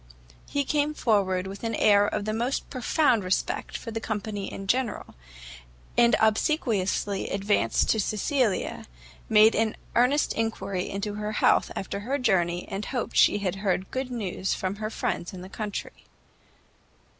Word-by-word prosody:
He 285 Hz, -, 0 dB
came 295 Hz, +2 st, 0 dB
forward 195 Hz, -7 st, +1 dB
with 195 Hz, +2 st, -8 dB
an 225 Hz, -1 st, -1 dB
air 205 Hz, -1 st, +5 dB
of 205 Hz, -, -2 dB
the 215 Hz, -, -1 dB
most 240 Hz, +5 st, -1 dB
profound 255 Hz, -, +2 dB
respect 185 Hz, +1 st, -1 dB
for 230 Hz, -, -7 dB
the 225 Hz, -, -3 dB
company 210 Hz, -2 st, -4 dB
in 195 Hz, -, -7 dB
general, 240 Hz, +2 st, -1 dB, 0.8 s
and 235 Hz, 0 st, +5 dB
obsequiously 215 Hz, -, +1 dB
advancing 195 Hz, -, +1 dB
to 220 Hz, -, +3 dB
Cecilia, 215 Hz, +1 st, 0 dB, 0.4 s
made 220 Hz, +1 st, +7 dB
an 220 Hz, 0 st, 0 dB, 0.2 s
earnest 255 Hz, +5 st, +3 dB
enquiry 200 Hz, -5 st, -2 dB
into 200 Hz, +1 st, -3 dB
her 210 Hz, +1 st, -4 dB
health -, -, +3 dB
after 195 Hz, +1 st, -4 dB
her 255 Hz, +7 st, -2 dB
journey, 180 Hz, -8 st, +1 dB
and 195 Hz, +2 st, -4 dB
hoped 245 Hz, -4 st, -3 dB
she -, -, +5 dB
had 195 Hz, -2 st, -2 dB
heard 190 Hz, -1 st, -1 dB
good 260 Hz, 0 st, -3 dB
news 195 Hz, -6 st, -2 dB
from 190 Hz, +1 st, -3 dB
her 215 Hz, 0 st, -3 dB
friends 180 Hz, -4 st, -3 dB
in 185 Hz, -, -8 dB
the 185 Hz, -, -9 dB
country. 210 Hz, -1 st, -6 dB
210 Hz, 155 wpm, -26 LUFS, 195-235 Hz, 0.8 s, made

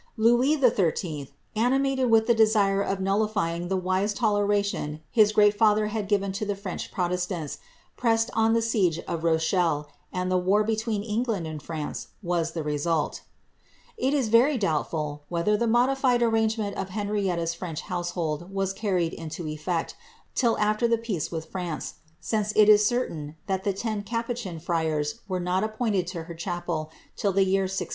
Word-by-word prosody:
Louis 240 Hz, +7 st, +4 dB
XIII., 170 Hz, -, +1 dB, 0.3 s
animated 265 Hz, +2 st, +2 dB
with 225 Hz, -1 st, +5 dB
the 235 Hz, -, +4 dB
desire 215 Hz, -3 st, +3 dB
of 195 Hz, -1 st, -1 dB
nullifying 195 Hz, -3 st, 0 dB
the 190 Hz, +1 st, 0 dB
wise 185 Hz, +3 st, 0 dB
toleration 205 Hz, -8 st, 0 dB
his 215 Hz, -3 st, +5 dB
great 210 Hz, -1 st, +5 dB
father 210 Hz, 0 st, +3 dB
had 215 Hz, -3 st, -2 dB
given 200 Hz, -1 st, +1 dB
to 195 Hz, +3 st, -4 dB
the 205 Hz, -1 st, -1 dB
French 195 Hz, -2 st, -6 dB
protestants, 180 Hz, -3 st, -2 dB, 0.4 s
pressed 225 Hz, -1 st, +2 dB
on 225 Hz, 0 st, +3 dB
the 230 Hz, 0 st, +2 dB
siege 195 Hz, -8 st, +1 dB
of 165 Hz, -1 st, -3 dB
Rochelle, 160 Hz, -2 st, +1 dB, 0.2 s
and 185 Hz, 0 st, -2 dB
war 200 Hz, +3 st, +3 dB
between 220 Hz, -1 st, -1 dB
England 215 Hz, -4 st, -1 dB
and 155 Hz, -2 st, -6 dB
France 155 Hz, 0 st, -5 dB, 0.2 s
was 170 Hz, -2 st, -1 dB
the 165 Hz, -, -3 dB
resulL 150 Hz, +1 st, -1 dB, 0.8 s
It 270 Hz, +3 st, 0 dB
is 260 Hz, -6 st, +1 dB
very 250 Hz, +6 st, +5 dB
doubtful, 155 Hz, -5 st, -1 dB
whether 175 Hz, +5 st, +1 dB
the 235 Hz, +3 st, 0 dB
modified 245 Hz, +1 st, +3 dB
arrangement 220 Hz, -2 st, +1 dB
of 195 Hz, 0 st, -3 dB
Henrietta's 195 Hz, -4 st, -1 dB
French 165 Hz, -2 st, -5 dB
household 175 Hz, -2 st, -3 dB
was 195 Hz, -1 st, -1 dB
carried 185 Hz, -5 st, 0 dB
into 160 Hz, +1 st, -6 dB
efiect, 155 Hz, +2 st, -3 dB, 0.4 s
till 235 Hz, -3 st, +2 dB
after 215 Hz, +3 st, +2 dB
the 230 Hz, 0 st, +2 dB
peace 220 Hz, -9 st, -3 dB
with 160 Hz, -2 st, -4 dB
France, 175 Hz, -4 st, -5 dB, 0.3 s
since 215 Hz, -2 st, -1 dB
it 215 Hz, -1 st, +6 dB
is 210 Hz, 0 st, +7 dB
certain 160 Hz, -12 st, -2 dB
that 190 Hz, -1 st, -2 dB
the 200 Hz, -, +1 dB
ten 210 Hz, +1 st, -3 dB
capuchin 230 Hz, -4 st, -4 dB
friara 160 Hz, -3 st, 0 dB, 0.2 s
were 185 Hz, -2 st, -2 dB
not 180 Hz, +2 st, 0 dB
appointed 215 Hz, -5 st, -1 dB
for 170 Hz, -3 st, -5 dB
her 170 Hz, -, -8 dB
chapel 170 Hz, -2 st, -3 dB, 0.3 s
till 200 Hz, -, 0 dB
the 195 Hz, +1 st, +3 dB
year 190 Hz, 0 st, +2 dB
1630.' 185 Hz, -2 st, -3 dB
195 Hz, 165 wpm, -26 LUFS, 170-220 Hz, 0.8 s, is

